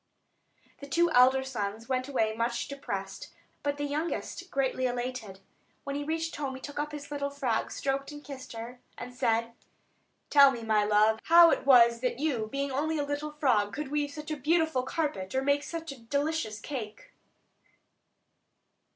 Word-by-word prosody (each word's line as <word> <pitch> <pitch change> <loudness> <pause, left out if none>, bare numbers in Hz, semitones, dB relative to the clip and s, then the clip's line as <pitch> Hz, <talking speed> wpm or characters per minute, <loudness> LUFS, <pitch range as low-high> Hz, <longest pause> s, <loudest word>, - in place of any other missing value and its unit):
The 280 - -9
two 340 +4 +2
elder 260 0 +5
sons 225 -3 -4
went 255 0 -1
away 220 -6 0
much 235 +1 -1
depressed; 195 -9 -6 0.3
but 285 0 -1
the 290 - -3
youngest 315 +4 -3
greatly 265 -3 0
elated. 245 -5 -5 0.4
When 280 0 -4
he 290 - -2
reached 325 +2 -2
home 275 -3 -3
he - - -8
took 285 +1 -6
up 295 0 -2
his 295 -1 -8
little 280 -1 -2
frog, 270 -5 -1
stroked 275 +1 -2
and 295 0 -10
kissed 270 -4 -9
her, 235 +2 -8 0.2
and 250 - -8
said: 230 -2 0 0.8
"Tell 280 -1 +8
me, 235 -4 -4
my 215 -2 +2
love, 215 +1 +3
how 335 0 +8
it - - -1
was 235 -3 +7
that 250 0 -1
you, 260 -7 -1
being 275 0 -2
only 310 +4 -1
a 290 - -1
little 290 +1 -4
frog, 235 -9 +1
could 295 -1 -4
weave 295 0 0
such 300 +1 -8
a 305 - -2
beautiful 320 -1 +2
carpet, 255 - -3
or 265 - +1
make 285 +1 +2
such 330 0 -6
a 275 - -10
delicious 280 -2 -2
cake?" 260 - -7
275 Hz, 175 wpm, -29 LUFS, 235-295 Hz, 0.8 s, Tell